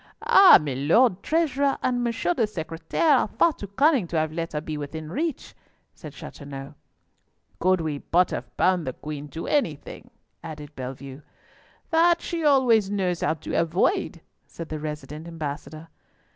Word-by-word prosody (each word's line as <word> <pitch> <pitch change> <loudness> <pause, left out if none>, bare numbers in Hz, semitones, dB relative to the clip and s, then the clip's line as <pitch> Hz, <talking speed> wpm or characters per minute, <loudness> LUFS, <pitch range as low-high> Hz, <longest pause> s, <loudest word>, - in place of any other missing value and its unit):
"Ah! 390 -1 +9
Milord 155 - +2
Treasurer 285 -3 +1
and 250 -1 +1
M. 245 - -1
le 235 +1 0
Secretaire 185 - 0
are - - 0
far 325 +9 +2
too 205 - -8
cunning 265 - +2
to 165 - -3
have 155 0 0
let 165 +1 -4
her 150 - -1
be 155 0 -6
within 150 +2 -6
reach," 315 - -3 0.4
said - - -10
Chateauneuf. 140 -1 -9 0.9
"Could 185 0 +2
we 155 -3 -3
but 180 +5 +1
have - - -6
bound 180 -4 +2
the 130 - -2
Queen 150 +1 -7
to 160 +3 -7
anything," 175 - -2 0.3
added 150 -2 -9
Bellievre. 135 +2 -8 0.7
"That 335 +1 +4
she 335 -2 -4
always 250 -8 +4
knows 185 -4 -1
how 160 - +1
to 155 - -8
avoid," 180 - 0 0.3
said 165 -1 -9
the 155 - -4
resident 150 +1 -7
ambassador. 155 0 -6
165 Hz, 155 wpm, -25 LUFS, 150-250 Hz, 0.9 s, Ah